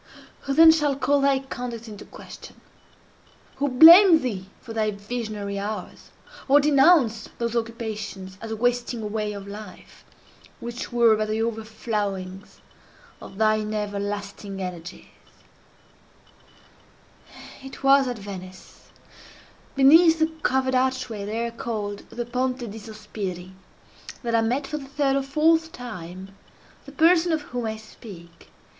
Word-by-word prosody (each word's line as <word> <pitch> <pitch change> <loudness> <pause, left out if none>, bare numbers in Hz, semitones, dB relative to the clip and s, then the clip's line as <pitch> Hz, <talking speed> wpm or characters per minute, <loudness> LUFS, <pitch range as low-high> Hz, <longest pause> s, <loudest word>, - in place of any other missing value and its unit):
Who 275 -1 -1
then 325 +1 +9
shall 300 -3 +1
call 280 +1 +1
thy 275 -1 +3
conduct 245 -3 -7
into 210 -2 -10
question? - - -13 1.0
who 285 - 0
blame 330 +5 +8
thee 195 -6 -4
for 230 - -10
thy 215 -1 0
visionary 205 -1 -5
hours, 205 -1 -6 0.4
or 285 +1 +6
denounce 275 -6 +3
those 235 0 -3
occupations 215 -5 -5
as 225 - -7
a 220 - -3
wasting 245 0 -1
away 210 0 -3
of 200 -1 -8
life, 205 -2 -11 0.6
which 235 +2 -6
were 235 -2 +4
but 215 0 -2
the 220 +1 -1
overflowings 210 -4 -4 0.6
of 195 - -11
thine 215 0 +1
everlasting 205 -1 -5
energies? 180 -1 -7 2.6
It 270 0 -11
was 275 0 +5
at 245 -2 -3
Venice, 185 -2 -11 0.9
beneath 320 +5 +6
the 320 0 +1
covered 260 -1 +1
archway 255 -5 -1
there 230 +3 -3
called 215 -3 -5
the 240 0 -5
Ponte 250 -1 -2
di 220 - -8
Sospiri, 205 -4 -7 0.7
that 235 -1 -2
I 230 - +4
met 250 +5 -1
for 300 +2 -4
the 275 - -10
third 280 -1 0
or 275 - +1
fourth 320 +4 +2
time 190 - -9 0.5
the - - -9
person 335 +4 +3
of 315 -2 -1
whom 245 -4 -4
I 220 0 -4
speak. 190 -6 -14
230 Hz, 130 wpm, -24 LUFS, 205-270 Hz, 2.6 s, then